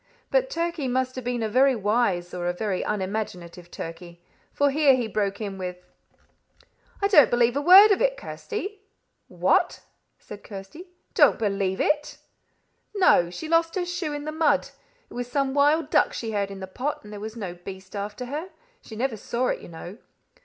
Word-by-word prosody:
But -, -, +2 dB
Turkey 335 Hz, -, -2 dB
must 255 Hz, +1 st, 0 dB
have 255 Hz, -, -5 dB
been 245 Hz, -1 st, -2 dB
a -, -, 0 dB
very 260 Hz, +4 st, +4 dB
wise 205 Hz, -5 st, 0 dB
or 175 Hz, -1 st, -3 dB
a 175 Hz, -, 0 dB
very 195 Hz, 0 st, -2 dB
unimaginative 185 Hz, -4 st, -4 dB
Turkey, 170 Hz, +1 st, -8 dB, 0.3 s
for 285 Hz, 0 st, +2 dB
here 285 Hz, -2 st, +5 dB
he 245 Hz, -3 st, -2 dB
broke 200 Hz, -1 st, -2 dB
in 200 Hz, -3 st, -5 dB
with 180 Hz, -1 st, -6 dB, 1.2 s
"I -, -, +5 dB
don't 305 Hz, -, +6 dB
believe 240 Hz, 0 st, +2 dB
a 285 Hz, -, 0 dB
word 385 Hz, +7 st, +9 dB
of 400 Hz, -, +2 dB
it, -, -, +2 dB
Kirsty." 420 Hz, -4 st, -6 dB, 0.5 s
"What!" -, -, +1 dB, 0.4 s
said 205 Hz, -1 st, -11 dB
Kirsty 200 Hz, -, -10 dB, 0.3 s
"don't -, -, +5 dB
believe 195 Hz, -3 st, -1 dB
it!" 300 Hz, 0 st, 0 dB, 0.8 s
"No. 365 Hz, -, +4 dB
She 310 Hz, -, -7 dB
lost 330 Hz, +1 st, +2 dB
her 365 Hz, -2 st, -1 dB
shoe 350 Hz, -3 st, -3 dB
in 290 Hz, 0 st, -5 dB
the 310 Hz, -, -3 dB
mud. 315 Hz, 0 st, +1 dB, 0.4 s
It -, -, -15 dB
was 245 Hz, 0 st, -5 dB
some 275 Hz, -1 st, 0 dB
wild 290 Hz, +2 st, +2 dB
duck -, -, +3 dB
she 225 Hz, -2 st, -4 dB
heard 200 Hz, -2 st, -1 dB
in 195 Hz, -1 st, -9 dB
the -, -, -4 dB
pot, 255 Hz, +10 st, -4 dB
and 210 Hz, 0 st, -11 dB
there 205 Hz, -, -7 dB
was 215 Hz, +2 st, -7 dB
no 195 Hz, -6 st, -5 dB
beast 190 Hz, +2 st, -10 dB
after 205 Hz, +4 st, -5 dB
her. 300 Hz, +8 st, -5 dB, 0.3 s
She 220 Hz, -, -11 dB
never 240 Hz, 0 st, -2 dB
saw 240 Hz, +4 st, -1 dB
it, -, -, -2 dB
you -, -, -11 dB
know." 175 Hz, +5 st, -10 dB
240 Hz, 190 wpm, -25 LUFS, 195-300 Hz, 1.2 s, word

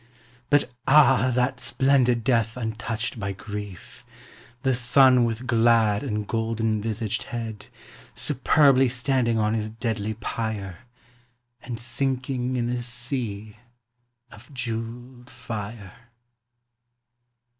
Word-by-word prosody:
But 145 Hz, -3 st, +3 dB, 0.2 s
ah! 135 Hz, -3 st, +5 dB
that 125 Hz, +1 st, +1 dB
splendid 130 Hz, -3 st, +2 dB
death 115 Hz, -2 st, +1 dB
untouched 115 Hz, 0 st, -3 dB
by 100 Hz, -1 st, -3 dB
grief: 105 Hz, -3 st, -8 dB, 0.6 s
The 135 Hz, -, +2 dB
sun 125 Hz, 0 st, +5 dB
with 115 Hz, +2 st, -3 dB
glad 115 Hz, -3 st, +3 dB
and 105 Hz, -6 st, -3 dB
golden 115 Hz, -2 st, -1 dB
visaged 110 Hz, 0 st, -2 dB
head 115 Hz, -3 st, -6 dB, 0.5 s
Superbly 135 Hz, -1 st, +3 dB
standing 125 Hz, -2 st, +1 dB
on 110 Hz, 0 st, +1 dB
his 110 Hz, -1 st, -2 dB
deadly 110 Hz, -1 st, -3 dB
pyre, 105 Hz, -6 st, -4 dB, 0.8 s
And 115 Hz, -2 st, -6 dB
sinking 130 Hz, +1 st, -2 dB
in 120 Hz, -1 st, 0 dB
a 125 Hz, 0 st, -2 dB
sea 120 Hz, -4 st, -4 dB, 0.7 s
of 115 Hz, +5 st, -15 dB
jewelled 120 Hz, 0 st, -6 dB
fire! 110 Hz, -4 st, -7 dB
115 Hz, 100 wpm, -25 LUFS, 110-125 Hz, 0.8 s, ah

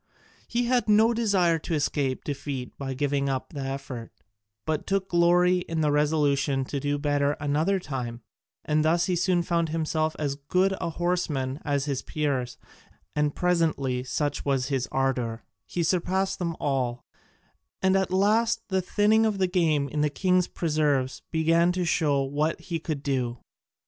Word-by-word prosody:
He 240 Hz, +1 st, 0 dB
had 245 Hz, -2 st, +1 dB
no 220 Hz, +3 st, +5 dB
desire 190 Hz, -8 st, +2 dB
to 165 Hz, +1 st, -3 dB
escape 140 Hz, -3 st, -1 dB
defeat 140 Hz, -3 st, -5 dB
by 135 Hz, -1 st, -5 dB
giving 140 Hz, 0 st, 0 dB
up 135 Hz, +5 st, -3 dB
the 145 Hz, -, -5 dB
effort, 135 Hz, -3 st, -5 dB, 0.5 s
but 155 Hz, -1 st, -2 dB
took 195 Hz, -1 st, 0 dB
glory 180 Hz, +1 st, +4 dB
in 165 Hz, -2 st, -3 dB
the 150 Hz, -1 st, +2 dB
resolution 145 Hz, -2 st, +1 dB
to 140 Hz, -, -3 dB
do 145 Hz, +1 st, -1 dB
better 145 Hz, -1 st, +1 dB
another 150 Hz, +7 st, 0 dB
time, 125 Hz, -7 st, -5 dB, 0.4 s
and 150 Hz, 0 st, +2 dB
thus 170 Hz, +2 st, +3 dB
he 185 Hz, -, 0 dB
soon 175 Hz, 0 st, +2 dB
found 170 Hz, -1 st, 0 dB
himself 155 Hz, 0 st, -1 dB
as 140 Hz, -2 st, -2 dB
good 185 Hz, +7 st, +1 dB
a 170 Hz, -, -1 dB
horseman 155 Hz, -6 st, -1 dB
as 140 Hz, -2 st, 0 dB
his 140 Hz, -3 st, -2 dB
peers, 135 Hz, -5 st, -2 dB, 0.6 s
and 150 Hz, -1 st, +1 dB
presently, 155 Hz, -8 st, +1 dB
such 145 Hz, +2 st, -2 dB
was 135 Hz, -1 st, 0 dB
his 135 Hz, -3 st, -1 dB
ardour, 125 Hz, -4 st, -1 dB, 0.2 s
he 175 Hz, -, -2 dB
surpassed 185 Hz, +3 st, 0 dB
them 170 Hz, -2 st, -2 dB
all, 125 Hz, -4 st, -1 dB, 0.8 s
and 190 Hz, 0 st, +4 dB
at 190 Hz, -1 st, +1 dB
last 215 Hz, +5 st, +2 dB
the 190 Hz, -1 st, +1 dB
thinning 210 Hz, +4 st, +3 dB
of 215 Hz, -2 st, +1 dB
the 190 Hz, -, +2 dB
game 165 Hz, -6 st, +1 dB
in 150 Hz, +2 st, -2 dB
the 150 Hz, -, +2 dB
king's 180 Hz, +4 st, +2 dB
preserves 150 Hz, -5 st, 0 dB
began 165 Hz, +2 st, +3 dB
to 180 Hz, -1 st, -1 dB
show 145 Hz, -5 st, +2 dB
what 150 Hz, +4 st, -1 dB
he 170 Hz, -2 st, -4 dB
could 155 Hz, -3 st, -4 dB
do. 125 Hz, -4 st, -1 dB
155 Hz, 165 wpm, -26 LUFS, 140-180 Hz, 0.8 s, no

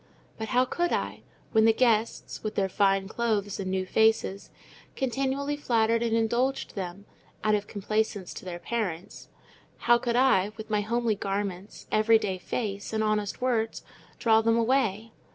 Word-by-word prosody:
But 220 Hz, -, -3 dB
how 250 Hz, +2 st, +3 dB
could 345 Hz, +6 st, -1 dB
I—when 220 Hz, -1 st, -1 dB
the 225 Hz, -, +6 dB
guests, 225 Hz, -2 st, +1 dB
with 215 Hz, -, -4 dB
their 195 Hz, -1 st, +1 dB
fine 195 Hz, 0 st, +2 dB
clothes 210 Hz, -3 st, -1 dB
and 190 Hz, -1 st, -3 dB
new 190 Hz, 0 st, -1 dB
faces, 220 Hz, -1 st, +1 dB, 0.5 s
continually 270 Hz, +2 st, -1 dB
flattered 230 Hz, -5 st, +1 dB
and 230 Hz, -1 st, +1 dB
indulged 240 Hz, +4 st, 0 dB
them, 190 Hz, 0 st, -6 dB, 0.4 s
out 215 Hz, -, +3 dB
of 205 Hz, -1 st, 0 dB
complaisance 205 Hz, -1 st, -2 dB
to -, -, -9 dB
their 175 Hz, -2 st, -5 dB
parents—how 220 Hz, +4 st, -3 dB
could 235 Hz, -1 st, -1 dB
I, 215 Hz, -6 st, +3 dB
with 220 Hz, 0 st, -8 dB
my 210 Hz, -1 st, +2 dB
homely 235 Hz, +1 st, 0 dB
garments, 195 Hz, -1 st, -4 dB
every 220 Hz, +1 st, +5 dB
day 190 Hz, -4 st, -3 dB
face, 200 Hz, +1 st, -4 dB
and 220 Hz, 0 st, +1 dB
honest 215 Hz, +1 st, -1 dB
words, 230 Hz, -3 st, 0 dB, 0.3 s
draw 225 Hz, -1 st, +4 dB
them 230 Hz, +1 st, +2 dB
away? 230 Hz, -3 st, +1 dB
220 Hz, 150 wpm, -27 LUFS, 200-235 Hz, 0.5 s, the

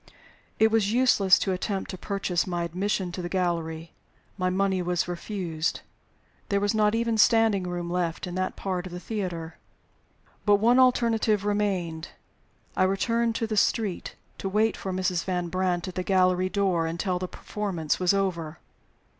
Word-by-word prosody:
It 220 Hz, 0 st, +4 dB
was 215 Hz, -2 st, +2 dB
useless 225 Hz, -6 st, +5 dB
to 195 Hz, -, -1 dB
attempt 190 Hz, +1 st, -2 dB
to -, -, -5 dB
purchase 195 Hz, -3 st, -1 dB
my 175 Hz, -1 st, -2 dB
admission 185 Hz, +2 st, -2 dB
to 180 Hz, -, -5 dB
the 175 Hz, -, -4 dB
gallery. 170 Hz, -3 st, -2 dB, 0.4 s
My 185 Hz, -2 st, 0 dB
money 190 Hz, 0 st, +1 dB
was 175 Hz, -1 st, 0 dB
refused. 175 Hz, -3 st, -3 dB, 0.7 s
There 200 Hz, -, +2 dB
was 205 Hz, +1 st, +1 dB
not 215 Hz, 0 st, +3 dB
even 230 Hz, -1 st, 0 dB
standing 225 Hz, -4 st, +4 dB
room 175 Hz, -1 st, -3 dB
left 175 Hz, -1 st, -2 dB
in 180 Hz, -, -6 dB
that 185 Hz, +1 st, -2 dB
part 185 Hz, -2 st, -3 dB
of 180 Hz, -, -10 dB
the 180 Hz, -, -5 dB
theater. 180 Hz, -6 st, -5 dB, 0.8 s
But 205 Hz, -1 st, +5 dB
one 235 Hz, +5 st, +4 dB
alternative 230 Hz, -5 st, +3 dB
remained. 190 Hz, -6 st, -1 dB, 0.7 s
I -, -, 0 dB
returned 230 Hz, +5 st, +1 dB
to 230 Hz, -, -1 dB
the 220 Hz, -1 st, -3 dB
street, 205 Hz, -2 st, 0 dB, 0.2 s
to 195 Hz, -, -3 dB
wait 215 Hz, +2 st, +2 dB
for 190 Hz, -, -5 dB
Mrs. 185 Hz, -2 st, 0 dB
Van 180 Hz, -2 st, -2 dB
Brandt 180 Hz, -1 st, -1 dB
at 185 Hz, -, -6 dB
the 185 Hz, -, -2 dB
gallery 185 Hz, -1 st, +2 dB
door 185 Hz, -5 st, +1 dB
until 180 Hz, +2 st, -2 dB
the 185 Hz, -, -3 dB
performance 180 Hz, -7 st, -3 dB
was 180 Hz, -1 st, +3 dB
over. 175 Hz, -5 st, -1 dB
185 Hz, 165 wpm, -26 LUFS, 175-210 Hz, 0.8 s, useless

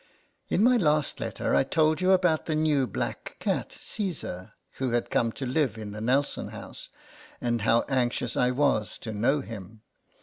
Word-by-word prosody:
In 200 Hz, -, +2 dB
my 250 Hz, +1 st, +6 dB
last 150 Hz, -, +1 dB
letter -, -, -2 dB
I -, -, +5 dB
told 155 Hz, +3 st, +2 dB
you 185 Hz, +1 st, +4 dB
about 180 Hz, -4 st, +3 dB
the 155 Hz, -, 0 dB
new 150 Hz, -4 st, +2 dB
black -, -, -4 dB
cat, -, -, -2 dB
Caesar, 115 Hz, -, -4 dB, 0.3 s
who 130 Hz, -3 st, 0 dB
had 120 Hz, -, 0 dB
come 115 Hz, -1 st, +2 dB
to 135 Hz, -, -5 dB
live 130 Hz, -3 st, 0 dB
in 105 Hz, -2 st, -6 dB
the 105 Hz, +1 st, -7 dB
Nelson 135 Hz, +5 st, +1 dB
house, -, -, -8 dB, 0.5 s
and 120 Hz, -2 st, 0 dB
how 115 Hz, +2 st, +4 dB
anxious 125 Hz, -2 st, 0 dB
I 125 Hz, -, +3 dB
was 125 Hz, -6 st, +1 dB
to 110 Hz, -, -6 dB
know 130 Hz, +8 st, +2 dB
him. 110 Hz, -3 st, -9 dB
130 Hz, 175 wpm, -27 LUFS, 115-155 Hz, 0.5 s, my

